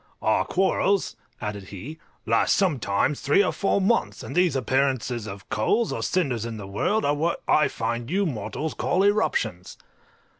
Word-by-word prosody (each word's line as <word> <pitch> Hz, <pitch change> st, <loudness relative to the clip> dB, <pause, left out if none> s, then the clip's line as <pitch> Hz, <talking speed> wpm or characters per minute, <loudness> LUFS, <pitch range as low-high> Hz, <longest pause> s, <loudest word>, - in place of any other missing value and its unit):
"Our -, -, +2 dB
quarrels," 195 Hz, +1 st, +1 dB, 0.2 s
added 105 Hz, -2 st, -5 dB
he, 125 Hz, -, -9 dB, 0.3 s
"last -, -, +3 dB
sometimes 140 Hz, -, +1 dB
three 145 Hz, +9 st, +4 dB
or 185 Hz, -, 0 dB
four 200 Hz, 0 st, +1 dB
months, 205 Hz, +5 st, 0 dB
and -, -, -7 dB
these 180 Hz, -5 st, +3 dB
appearances 130 Hz, -3 st, 0 dB
of 100 Hz, -1 st, -9 dB
coals 210 Hz, -, +1 dB
or -, -, -3 dB
cinders 135 Hz, -, 0 dB
in 115 Hz, -1 st, -5 dB
the 100 Hz, -, -7 dB
world 105 Hz, -, 0 dB
are 145 Hz, -, +3 dB
what 160 Hz, +4 st, -1 dB
I 150 Hz, -1 st, +4 dB
find 115 Hz, +1 st, -3 dB
you 195 Hz, +4 st, +1 dB
mortals 155 Hz, -, -3 dB
call 185 Hz, -, +1 dB
eruptions." 115 Hz, -, 0 dB
140 Hz, 160 wpm, -25 LUFS, 110-185 Hz, 0.3 s, three